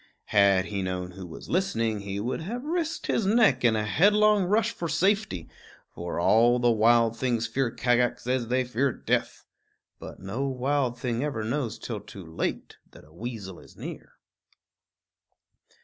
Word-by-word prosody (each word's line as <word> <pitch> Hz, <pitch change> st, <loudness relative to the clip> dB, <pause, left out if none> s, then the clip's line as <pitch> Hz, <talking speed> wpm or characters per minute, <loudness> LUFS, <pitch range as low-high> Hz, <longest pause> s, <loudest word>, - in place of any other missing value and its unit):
Had 100 Hz, -2 st, +5 dB
he 100 Hz, -2 st, -3 dB
known 90 Hz, -1 st, -3 dB
who 95 Hz, 0 st, -9 dB
was 80 Hz, -, -10 dB
listening, 115 Hz, -, 0 dB
he 100 Hz, 0 st, -5 dB
would 120 Hz, +8 st, -3 dB
have 235 Hz, +9 st, -5 dB
risked 325 Hz, +1 st, -2 dB
his 215 Hz, -, 0 dB
neck 200 Hz, -, +4 dB
in 115 Hz, -2 st, +4 dB
a 105 Hz, -1 st, 0 dB
headlong 205 Hz, -, +4 dB
rush 220 Hz, +4 st, +2 dB
for 170 Hz, -7 st, -5 dB
safety; 170 Hz, -, 0 dB, 0.5 s
for 85 Hz, 0 st, -4 dB
all 115 Hz, +7 st, +4 dB
the 120 Hz, -1 st, +3 dB
wild 115 Hz, +1 st, +4 dB
things 120 Hz, -1 st, 0 dB
fear 120 Hz, +3 st, 0 dB
Kagax 120 Hz, +1 st, +1 dB
as 125 Hz, -1 st, 0 dB
they 130 Hz, +2 st, +1 dB
fear 125 Hz, +2 st, 0 dB
death. -, -, -2 dB, 0.5 s
But -, -, -10 dB
no 105 Hz, +10 st, -3 dB
wild 130 Hz, -1 st, 0 dB
thing 120 Hz, 0 st, -2 dB
ever 135 Hz, -7 st, -2 dB
knows 120 Hz, -1 st, -2 dB
till 115 Hz, -3 st, -5 dB
too 100 Hz, -2 st, -11 dB
late 80 Hz, 0 st, -4 dB
that -, -, -16 dB
a 75 Hz, -, -21 dB
weasel 105 Hz, -2 st, -7 dB
is -, -, -17 dB
near. -, -, -8 dB
120 Hz, 165 wpm, -27 LUFS, 105-145 Hz, 0.5 s, Had